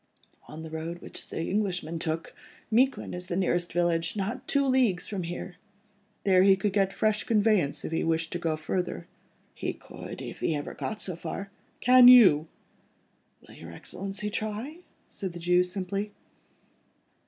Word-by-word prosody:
"On 155 +1 -9
the 160 - -8
road 165 +2 -5
which - - -8
the - - -4
Englishman 180 -4 -1
took, 160 0 -3 0.4
Miquelon 260 +5 +2
is 180 0 -6
the 175 - -2
nearest 175 -2 0
village, 170 0 0
not 205 +3 -3
two 280 -1 +2
leagues 250 -9 +2
from 200 -3 -3
here." 175 +1 -6 0.7
"There 185 -2 +5
he 195 0 +6
could 190 +1 -1
get 195 -1 +2
fresh 210 +1 +1
conveyance, 210 -9 +2
if - - -4
he 165 - 0
wanted 165 0 0
to 175 - -3
go 165 -2 0
further?" 160 - -3 0.5
"He - - -3
could—if - - -9
he 160 - 0
ever 145 - -4
got 215 - -4
so 185 - -3
far." 195 +3 -6 0.3
"Can 250 0 +8
you?" 195 -12 +8 1.0
"Will - - -14
your 85 +1 -11
Excellency 195 - -5
try?" 220 +10 -4 0.3
said 190 -3 -5
the 175 - -7
Jew 180 +1 +3
simply. 195 +3 -4
185 Hz, 160 wpm, -28 LUFS, 165-210 Hz, 1.0 s, Can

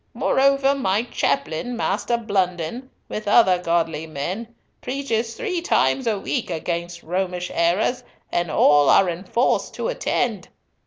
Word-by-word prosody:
Moreover, 275 0 +3
my 220 -6 0
chaplain, 245 - -2
Master 225 +3 0
Blunden, 200 +2 -2 0.2
with 215 -1 -6
other 190 -4 +5
godly 165 -2 -1
men, 175 +10 -4 0.3
preaches 245 -4 -2
three 380 -8 -2
times 270 -6 +1
a 215 -2 +1
week 230 +4 -3
against 170 +1 -4
Romish 180 +1 -2
errors, 180 +9 +1 0.3
and 175 -1 0
all 145 -2 +4
are 195 - +5
enforced 185 +8 -1
to - - -2
attend. 235 - -1
195 Hz, 125 wpm, -22 LUFS, 175-245 Hz, 0.3 s, other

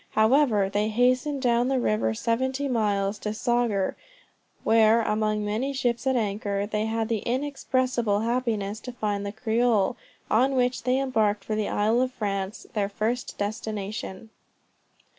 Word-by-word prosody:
However 220 -3 +4
they 205 +2 0
hastened 255 +5 +1
down 240 0 +3
the 265 -1 +1
river 110 - 0
seventy 260 - -1
miles, 205 -4 0
to 210 0 -3
Saugur, 240 -5 0 0.7
where, 225 0 +5
among 215 -1 0
many 230 +7 -1
ships 245 -1 -1
at 265 - +2
anchor, 205 -2 -1
they 210 +1 -1
had 225 0 -1
the 225 -2 0
inexpressible 255 -4 0
happiness 225 -3 -1
to 250 - -8
find 205 -3 -2
the 200 - -3
Creole, 225 0 +1 0.3
on 260 +5 +2
which 250 -1 0
they 255 +1 +2
embarked 220 -7 +1
for 215 - -3
the 215 -1 -1
Isle 220 +4 +2
of 255 0 0
France, 200 -4 -3
their 200 -2 0
first 225 +4 -2
destination. 210 0 -4
220 Hz, 145 wpm, -26 LUFS, 205-250 Hz, 0.7 s, where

